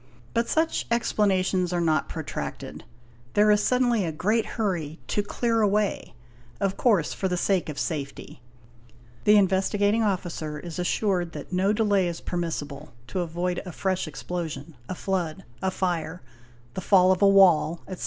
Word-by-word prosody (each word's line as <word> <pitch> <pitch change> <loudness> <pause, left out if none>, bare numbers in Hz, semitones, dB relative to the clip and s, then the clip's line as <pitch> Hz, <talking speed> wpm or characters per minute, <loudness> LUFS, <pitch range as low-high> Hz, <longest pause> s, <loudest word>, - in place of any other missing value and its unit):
But 230 0 0
such 320 +1 0
explanations 190 -5 +1
are 175 - 0
not 160 -2 +1
protracted; - - -6 0.5
there 210 +1 +5
is 210 0 +4
suddenly 245 -4 +2
a 165 - -2
great 210 +8 0
hurry 170 -8 -2
"to 205 - +1
clear 230 +2 0
away', 205 - 0 0.4
of 195 -1 0
course 205 -11 +2
for 190 - -2
the 180 -1 -1
sake 185 -2 +1
of 150 - -6
safety; 140 -5 -5 0.8
the 210 0 +7
Investigating 205 +2 +2
Officer 175 -7 -2
is 170 +2 -7
assured 180 -1 0
that 150 +4 -8
no 190 +3 +2
delay 205 -4 +2
is 170 -1 -4
permissible, 150 -6 -5
to 185 - -4
avoid 175 +1 -2
a 180 - -7
fresh 185 0 -1
explosion, 160 -1 -5
a 185 - -3
flood, 180 -5 -2 0.2
a 190 - +1
fire, 180 -2 -2 0.5
the 185 - -4
fall 185 -1 +5
of 185 - +1
a 200 - +7
wall, 180 -4 +5
etc. 185 - -7
185 Hz, 155 wpm, -26 LUFS, 170-205 Hz, 0.8 s, the